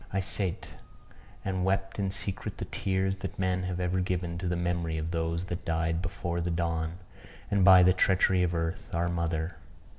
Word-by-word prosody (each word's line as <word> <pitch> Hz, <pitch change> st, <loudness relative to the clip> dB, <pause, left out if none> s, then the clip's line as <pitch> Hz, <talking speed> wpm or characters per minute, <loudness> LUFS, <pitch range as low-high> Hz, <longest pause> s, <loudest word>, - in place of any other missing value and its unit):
I 95 Hz, -, 0 dB
sate, 95 Hz, -1 st, -1 dB, 0.7 s
and 95 Hz, -1 st, -1 dB
wept 95 Hz, +1 st, 0 dB
in 100 Hz, -1 st, +1 dB
secret 95 Hz, 0 st, -3 dB
the -, -, -4 dB
tears 95 Hz, 0 st, -1 dB
that -, -, -6 dB
men 95 Hz, -1 st, 0 dB
have 90 Hz, -1 st, -3 dB
ever 90 Hz, +1 st, 0 dB
given 90 Hz, -2 st, -2 dB
to 90 Hz, -, -3 dB
the 90 Hz, -, 0 dB
memory 85 Hz, -2 st, -1 dB
of 80 Hz, +1 st, -3 dB
those 85 Hz, +1 st, -1 dB
that 90 Hz, -2 st, -5 dB
died 80 Hz, 0 st, 0 dB
before 85 Hz, 0 st, -3 dB
the 85 Hz, -, -1 dB
dawn, 85 Hz, -1 st, -1 dB, 0.5 s
and 100 Hz, -2 st, +3 dB
by 90 Hz, -1 st, +9 dB
the 90 Hz, +1 st, +6 dB
treachery 95 Hz, 0 st, +3 dB
of 85 Hz, -1 st, +1 dB
earth, 85 Hz, +5 st, -3 dB
our 85 Hz, +1 st, +1 dB
mother. 85 Hz, -1 st, -2 dB
90 Hz, 185 wpm, -29 LUFS, 85-95 Hz, 0.7 s, by